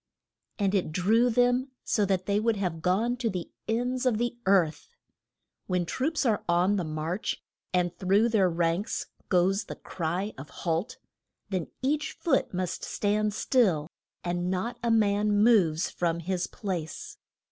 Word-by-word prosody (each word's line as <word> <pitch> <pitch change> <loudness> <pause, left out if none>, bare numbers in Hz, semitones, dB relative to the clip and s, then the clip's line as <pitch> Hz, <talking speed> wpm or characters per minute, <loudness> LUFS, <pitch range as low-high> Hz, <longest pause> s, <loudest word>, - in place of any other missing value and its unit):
And 200 -2 +1
it 190 -6 +1
drew 220 +9 +3
them 245 +2 +2
so 210 -3 +1
that 185 -1 0
they 200 +1 +2
would 225 +1 +2
have 180 -5 -2
gone 215 +8 +1
to 235 -2 0
the 180 -4 -5 0.2
ends 245 +3 0
of 235 -4 +2
the 240 +1 -1
earth. 180 - +2 0.8
When 180 -2 0
troops 285 - -1
are 220 -4 +1
on 180 +4 +3
the 185 - 0
march, 155 +5 -3 0.3
and 180 -1 +1
through 200 +5 +3
their 200 -5 +3
ranks 170 +3 0 0.2
goes 190 +3 +2
the - - -7
cry 180 +5 -3
of 140 +2 -9
Halt! 170 +6 -2 0.5
then 185 -5 -2 0.2
each 295 +3 0
foot 335 - +1
must 185 -1 -3
stand 210 0 0
still, 195 - +2 0.4
and 175 0 -1
not 190 +6 -2
a 235 - 0
man 210 -2 +3
moves 180 -9 +4
from 170 -1 -1
his 180 +1 -1
place. 175 -7 -5
195 Hz, 155 wpm, -28 LUFS, 175-225 Hz, 0.8 s, moves